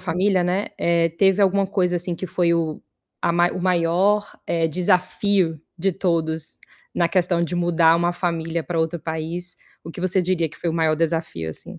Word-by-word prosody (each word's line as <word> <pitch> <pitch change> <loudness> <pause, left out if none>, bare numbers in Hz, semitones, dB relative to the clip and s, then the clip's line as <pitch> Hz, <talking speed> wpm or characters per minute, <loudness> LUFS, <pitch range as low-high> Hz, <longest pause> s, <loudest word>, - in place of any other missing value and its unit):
família, 185 +2 +1
né, 185 +3 0
eh, 170 -1 +2
teve 195 +4 +3
alguma 195 0 +3
coisa, 180 -2 0
assim, 175 0 -2
que 185 - -5
foi 170 0 +1
o 160 -2 -2 0.4
a - - +2 0.2
o 185 - -4
maior, 185 +4 +2 0.2
eh, 165 -1 +1
desafio 180 -1 +1 0.2
de 190 +3 +1
todos 160 -3 -1 0.4
na 170 - +2
questão 175 -2 +1
de 175 - -5
mudar 170 -2 +3
uma 175 +1 +1
família 170 -2 -2
pra 170 -2 -1
outro 160 +1 -1
país? 165 +3 -5 0.3
O 165 - -7
que 175 - -8
você 185 0 +1
diria 170 -3 0
que 150 - -14
foi 170 - -1
o - - -3
maior 160 -1 +2
desafio, 160 - -2
assim? - - -11
170 Hz, 185 wpm, -22 LUFS, 165-185 Hz, 0.4 s, teve